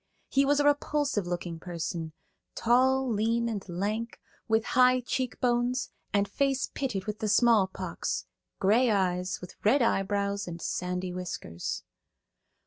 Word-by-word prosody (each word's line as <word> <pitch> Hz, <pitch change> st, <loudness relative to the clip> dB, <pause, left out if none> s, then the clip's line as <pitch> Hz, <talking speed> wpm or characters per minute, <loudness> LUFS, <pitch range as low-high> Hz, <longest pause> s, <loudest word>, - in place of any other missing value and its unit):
He 275 Hz, +1 st, +3 dB
was 290 Hz, +1 st, +3 dB
a 290 Hz, -, +2 dB
repulsive 290 Hz, -7 st, +1 dB
looking 175 Hz, -1 st, -4 dB
person, 165 Hz, -2 st, -4 dB, 0.4 s
tall, 260 Hz, +3 st, +3 dB
lean 230 Hz, +1 st, +1 dB
and 210 Hz, -4 st, -3 dB
lank, 210 Hz, +6 st, -3 dB, 0.3 s
with 220 Hz, 0 st, +2 dB
high 255 Hz, 0 st, +5 dB
cheekbones 250 Hz, 0 st, 0 dB, 0.2 s
and 200 Hz, 0 st, +2 dB
face 275 Hz, +5 st, 0 dB
pitted 230 Hz, -9 st, -2 dB
with 210 Hz, 0 st, -4 dB
the 215 Hz, -, -1 dB
small 215 Hz, -2 st, +5 dB
pox, 190 Hz, -, -4 dB, 0.3 s
gray 230 Hz, +6 st, +4 dB
eyes, 185 Hz, -3 st, 0 dB
with 180 Hz, -, -12 dB
red 245 Hz, +5 st, +4 dB
eyebrows 200 Hz, -1 st, 0 dB
and 170 Hz, -1 st, -6 dB
sandy 180 Hz, +1 st, -3 dB
whiskers. 175 Hz, -, -5 dB
215 Hz, 135 wpm, -29 LUFS, 185-250 Hz, 0.4 s, high